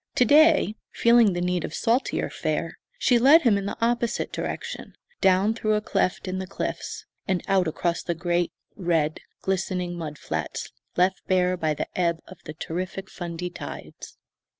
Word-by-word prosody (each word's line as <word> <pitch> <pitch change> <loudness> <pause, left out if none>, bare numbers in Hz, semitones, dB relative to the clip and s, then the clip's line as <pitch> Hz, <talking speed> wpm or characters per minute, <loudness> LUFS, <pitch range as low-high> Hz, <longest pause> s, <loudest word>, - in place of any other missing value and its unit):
To 250 - +5
day, 305 -3 +5 0.2
feeling 235 -4 +5
the 175 - -2
need 180 -1 0
of 155 - -5
saltier 240 +3 0
fare, - - -2 0.2
she 245 - +4
led 285 +7 +7
him 235 -5 +5
in 200 0 -2
the - - -4
opposite 235 0 0
direction, - - -5 0.2
down 190 +3 +4
through 215 -1 0
a 210 - +1
cleft 185 -2 0
in 185 0 -2
the 190 - -4
cliffs, - - -4 0.2
and 185 -3 0
out 190 -3 +3
across 170 +2 -1
the 170 - -2
great, 175 0 0 0.2
red, 165 -5 0 0.2
glistening 180 -2 -1
mud 155 -3 -5
flats - - -4 0.3
left 185 +2 +2
bare 185 -1 +3
by 155 -3 0
the - - -2
ebb 170 -2 +1
of 185 - -12
the 155 - -6
terrific 185 +4 -5
Fundy 175 0 -5
tides. - - -9
185 Hz, 170 wpm, -25 LUFS, 175-215 Hz, 0.3 s, led